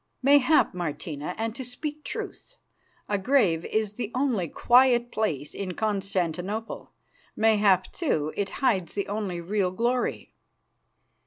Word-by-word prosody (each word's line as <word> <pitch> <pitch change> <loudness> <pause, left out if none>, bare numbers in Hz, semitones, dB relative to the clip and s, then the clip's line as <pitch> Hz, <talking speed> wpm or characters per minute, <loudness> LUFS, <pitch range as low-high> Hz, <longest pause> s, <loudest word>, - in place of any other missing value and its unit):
"Mayhap, 285 +3 +5
Martina, 155 -1 -4
and 225 0 -2
to 265 - -5
speak 295 +5 -6
truth, - - -6 0.5
a 205 -1 0
grave 195 -8 +2
is 215 -2 -1
the 225 -1 -5
only 250 -9 +1
quiet 240 - +4
place 150 -10 -2
in 185 -3 -5
Constantinople. 195 0 -2 0.4
Mayhap, 210 -4 +3
too, 155 - -1
it 200 -1 -1 0.2
hides 190 -9 +1
the 200 - -2
only 200 -4 -3
real 190 +2 0
glory." 235 +6 -1
210 Hz, 120 wpm, -26 LUFS, 180-245 Hz, 0.5 s, Mayhap